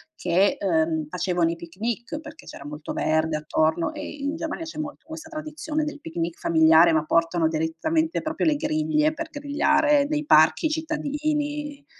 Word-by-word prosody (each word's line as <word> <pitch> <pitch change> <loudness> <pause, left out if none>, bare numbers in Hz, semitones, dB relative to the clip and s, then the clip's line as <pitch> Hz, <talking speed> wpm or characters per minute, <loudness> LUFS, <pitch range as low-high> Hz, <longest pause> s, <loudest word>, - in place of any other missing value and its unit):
che, 180 +3 +2
uhm, 160 -4 +1
facevano 175 0 0
i - - -4
picnic, 220 - -5
perché 315 0 -12
c'era - - -10
molto 150 +1 -6
verde, 155 0 +1
attorno, 155 - 0
e, 300 - -7 0.2
in 285 +3 -1
Germania, 325 +1 -4
c'è 315 -1 -8
molto 295 -1 -6
questa 320 0 -9
tradizione 310 -1 -4
del 300 0 -5
picnic 165 +1 -4
familiare, 160 +1 +5
ma 155 -1 +1
portano 165 +1 +2
direttamente, 310 - -1
proprio, 315 +1 -1
le 310 - +3
griglie, 310 0 +1
per 320 +1 -6
grigliare, 295 0 +2
nei 300 0 -2
parchi 160 - +5
cittadini, 295 -2 -3
285 Hz, 155 wpm, -24 LUFS, -, 0.2 s, familiare